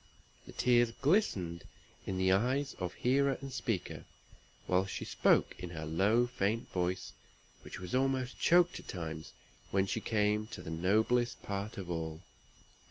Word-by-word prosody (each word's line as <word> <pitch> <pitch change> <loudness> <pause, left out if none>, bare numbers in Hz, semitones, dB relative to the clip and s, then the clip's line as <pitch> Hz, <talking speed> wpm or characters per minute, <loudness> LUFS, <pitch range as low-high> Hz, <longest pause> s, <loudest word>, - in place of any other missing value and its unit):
The - - -9
tears 120 -2 +3
glistened 120 - +1 0.4
in 95 - -2
the 95 0 +3
eyes 130 +8 +1
of 90 -2 -3
hearer 135 +2 +2
and 135 -1 -7
speaker, 110 -8 -3 0.6
while 95 +1 +2
she - - -5
spoke - - +3
in 90 -1 -5
her 80 -2 -6
low, 100 +10 +3
faint 115 -2 -1
voice, 90 0 -2 0.5
which - - -9
was 90 -1 -7
almost 130 -1 0
choked 175 0 +4
at - - -14
times 80 -3 -6 0.4
when 95 0 +2
she 95 - -2
came 105 -1 +1
to - - -8
the 80 - -6
noblest 110 +8 +1
part 100 +1 -4
of 90 -3 -5
all. 80 0 -4
105 Hz, 155 wpm, -33 LUFS, 90-125 Hz, 0.6 s, choked